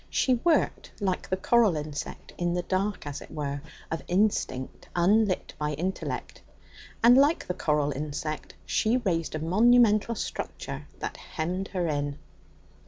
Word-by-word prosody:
She 260 Hz, -, +2 dB
worked 315 Hz, +7 st, +1 dB
like 190 Hz, -3 st, -1 dB
the 185 Hz, -, +1 dB
coral 210 Hz, -3 st, +4 dB
insect, 150 Hz, -1 st, -6 dB
in 175 Hz, 0 st, 0 dB
the 175 Hz, -, -1 dB
dark, 195 Hz, +1 st, -1 dB
as 145 Hz, 0 st, -5 dB
it -, -, -11 dB
were, 145 Hz, -1 st, -3 dB, 0.3 s
of 160 Hz, -, -2 dB
instinct 180 Hz, -9 st, 0 dB
unlit 195 Hz, +3 st, +2 dB
by 150 Hz, 0 st, -1 dB
intellect, 180 Hz, +6 st, -4 dB, 0.6 s
and, 240 Hz, +2 st, +8 dB
like 285 Hz, +5 st, +4 dB
the 180 Hz, -, -2 dB
coral 150 Hz, -4 st, +1 dB
insect, 150 Hz, +2 st, -4 dB
she 225 Hz, +3 st, +2 dB
raised 170 Hz, -10 st, -1 dB
a -, -, -2 dB
monumental 215 Hz, +5 st, +4 dB
structure -, -, -5 dB
that -, -, -5 dB
hemmed 180 Hz, +4 st, -3 dB
her 180 Hz, -3 st, -2 dB
in. 145 Hz, -1 st, -1 dB
180 Hz, 145 wpm, -28 LUFS, 150-215 Hz, 0.6 s, and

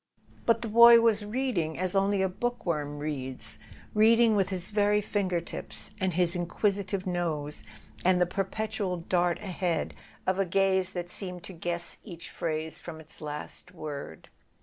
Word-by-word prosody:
But 230 Hz, 0 st, +3 dB
the -, -, -2 dB
boy 235 Hz, +2 st, +9 dB
was 225 Hz, -2 st, +3 dB
reading 210 Hz, -8 st, -1 dB
as 185 Hz, +1 st, 0 dB
only 195 Hz, 0 st, +3 dB
a -, -, +3 dB
bookworm 170 Hz, -9 st, -2 dB
reads—read¬ 145 Hz, -, 0 dB
ing 230 Hz, -2 st, +5 dB
with 195 Hz, -2 st, +2 dB
his 185 Hz, -2 st, -3 dB
very 210 Hz, 0 st, +3 dB
finger 195 Hz, -4 st, 0 dB
tips, 170 Hz, -, -5 dB
and 190 Hz, -1 st, +1 dB
his 175 Hz, 0 st, +3 dB
inquisitive 190 Hz, +2 st, -1 dB
nose, 165 Hz, -5 st, -2 dB, 0.4 s
and 180 Hz, 0 st, +4 dB
the 180 Hz, -, +5 dB
perpetual 195 Hz, +1 st, -2 dB
dart 175 Hz, 0 st, +1 dB
ahead 180 Hz, -3 st, -1 dB, 0.3 s
of 185 Hz, +1 st, +1 dB
a 195 Hz, -, +3 dB
gaze 190 Hz, 0 st, +2 dB
that 175 Hz, -1 st, -4 dB
seemed 180 Hz, -3 st, -6 dB
to 190 Hz, -, -7 dB
guess 170 Hz, 0 st, -3 dB
each 170 Hz, -5 st, -9 dB
phrase 160 Hz, -1 st, -3 dB
from 160 Hz, -2 st, -8 dB
its 160 Hz, -1 st, -9 dB
last 150 Hz, +4 st, -7 dB
word. 145 Hz, -, -7 dB
185 Hz, 155 wpm, -29 LUFS, 170-205 Hz, 0.4 s, boy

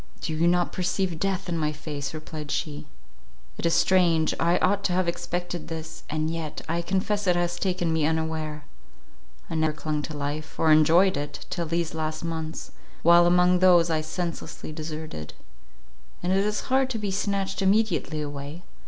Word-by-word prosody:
"Do 160 Hz, -, -3 dB
you 160 Hz, +2 st, +2 dB
not 175 Hz, 0 st, +2 dB
perceive 180 Hz, -2 st, -1 dB
death 195 Hz, 0 st, -1 dB
in 175 Hz, -, -1 dB
my 155 Hz, -1 st, +1 dB
face," 145 Hz, -2 st, -5 dB
replied 155 Hz, -1 st, -7 dB
she, 150 Hz, +1 st, -3 dB, 0.7 s
"it -, -, +1 dB
is 165 Hz, -, +2 dB
strange; 170 Hz, -2 st, +3 dB
I 170 Hz, +2 st, +3 dB
ought 200 Hz, +2 st, +1 dB
to 180 Hz, -, +2 dB
have 185 Hz, 0 st, +1 dB
expected 175 Hz, 0 st, -3 dB
this, 160 Hz, -1 st, -6 dB
and 155 Hz, +1 st, -1 dB
yet 165 Hz, -2 st, -4 dB
I 170 Hz, +1 st, 0 dB
confess 195 Hz, +3 st, -1 dB
it 180 Hz, -, +4 dB
has 175 Hz, 0 st, 0 dB
taken 180 Hz, -3 st, 0 dB
me 155 Hz, -2 st, +2 dB
unaware. 160 Hz, -1 st, -2 dB, 0.8 s
I -, -, -6 dB
never 160 Hz, -1 st, +1 dB
clung 155 Hz, -1 st, -2 dB
to 150 Hz, 0 st, -6 dB
life, 145 Hz, +2 st, -4 dB
or 160 Hz, -, +4 dB
enjoyed 165 Hz, +5 st, +5 dB
it, 145 Hz, +1 st, -5 dB
till 170 Hz, -2 st, -2 dB
these 165 Hz, 0 st, -1 dB
last 155 Hz, 0 st, -3 dB
months, 160 Hz, -1 st, -4 dB, 0.3 s
while 170 Hz, +1 st, +7 dB
among 180 Hz, +1 st, +4 dB
those 175 Hz, -2 st, +5 dB
I 155 Hz, -1 st, +1 dB
senselessly 165 Hz, 0 st, -5 dB
deserted: 155 Hz, -, -6 dB, 0.9 s
and 180 Hz, -, +1 dB
it 195 Hz, +1 st, +2 dB
is 210 Hz, 0 st, 0 dB
hard 265 Hz, 0 st, +1 dB
to 245 Hz, -, -2 dB
be 205 Hz, -2 st, -2 dB
snatched 195 Hz, 0 st, -1 dB
immediately 190 Hz, -6 st, +2 dB
away. 145 Hz, +3 st, -7 dB
165 Hz, 175 wpm, -26 LUFS, 155-180 Hz, 0.9 s, while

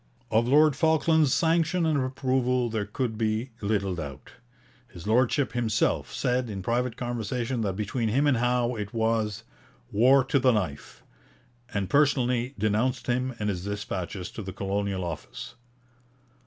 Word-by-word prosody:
Of 115 Hz, +2 st, +3 dB
Lord 150 Hz, +2 st, +5 dB
Falkland's 160 Hz, -1 st, +3 dB
sanction 165 Hz, +2 st, +2 dB
and 150 Hz, -4 st, +2 dB
approval 130 Hz, -2 st, 0 dB
there 105 Hz, -2 st, -2 dB
could 110 Hz, 0 st, -3 dB
be 110 Hz, +3 st, -1 dB
little 100 Hz, -2 st, 0 dB
doubt. 70 Hz, -6 st, -7 dB, 0.6 s
His 85 Hz, -2 st, -11 dB
Lordship 125 Hz, +5 st, +2 dB
himself 115 Hz, -3 st, 0 dB
said 125 Hz, -1 st, 0 dB
in 95 Hz, -3 st, -5 dB
private 120 Hz, +2 st, -1 dB
conversation 120 Hz, 0 st, -2 dB
that 100 Hz, -4 st, -1 dB
between 110 Hz, +3 st, -1 dB
him 135 Hz, +7 st, +2 dB
and 140 Hz, -4 st, +3 dB
Howe 120 Hz, 0 st, +1 dB
it 105 Hz, +1 st, -6 dB
was 110 Hz, -1 st, 0 dB, 0.5 s
'war 130 Hz, +6 st, +5 dB
to 135 Hz, +2 st, +1 dB
the 130 Hz, -1 st, +4 dB
knife,' 90 Hz, -10 st, -4 dB, 0.7 s
and 100 Hz, -2 st, -1 dB
personally 125 Hz, -1 st, +2 dB
denounced 110 Hz, +4 st, 0 dB
him 125 Hz, +1 st, -1 dB
in 105 Hz, -, -1 dB
his 90 Hz, -4 st, -2 dB
dispatches 100 Hz, -2 st, -4 dB
to -, -, -7 dB
the 95 Hz, -2 st, -6 dB
Colonial 100 Hz, -1 st, -2 dB
Office. 75 Hz, -7 st, -7 dB
115 Hz, 145 wpm, -27 LUFS, 105-130 Hz, 0.7 s, Lord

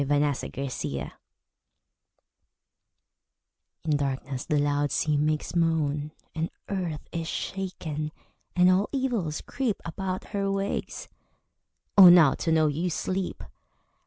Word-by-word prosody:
The 145 Hz, 0 st, 0 dB, 0.5 s
Charm -, -, -5 dB, 2.7 s
In 155 Hz, -2 st, +1 dB
darkness 135 Hz, -1 st, -3 dB
the 150 Hz, -, +2 dB
loud 145 Hz, 0 st, +1 dB
sea 150 Hz, -1 st, +1 dB
makes 150 Hz, +3 st, 0 dB
moan; 155 Hz, -3 st, +1 dB, 0.2 s
And 160 Hz, +1 st, -2 dB, 0.2 s
earth 175 Hz, -6 st, -3 dB
is 165 Hz, -1 st, -3 dB
shaken, 160 Hz, -7 st, -4 dB, 0.4 s
and 180 Hz, 0 st, +6 dB
all 190 Hz, +3 st, +2 dB
evils 235 Hz, -, -1 dB
creep 255 Hz, -7 st, -2 dB
About 185 Hz, +2 st, -3 dB
her 200 Hz, -2 st, -1 dB
ways. 195 Hz, 0 st, -3 dB, 0.9 s
Oh, 190 Hz, -3 st, +11 dB
now 170 Hz, -5 st, +7 dB
to 165 Hz, -, -2 dB
know 160 Hz, -1 st, +4 dB
you 155 Hz, +4 st, 0 dB
sleep! 185 Hz, +2 st, -3 dB
160 Hz, 110 wpm, -27 LUFS, 150-185 Hz, 2.7 s, Oh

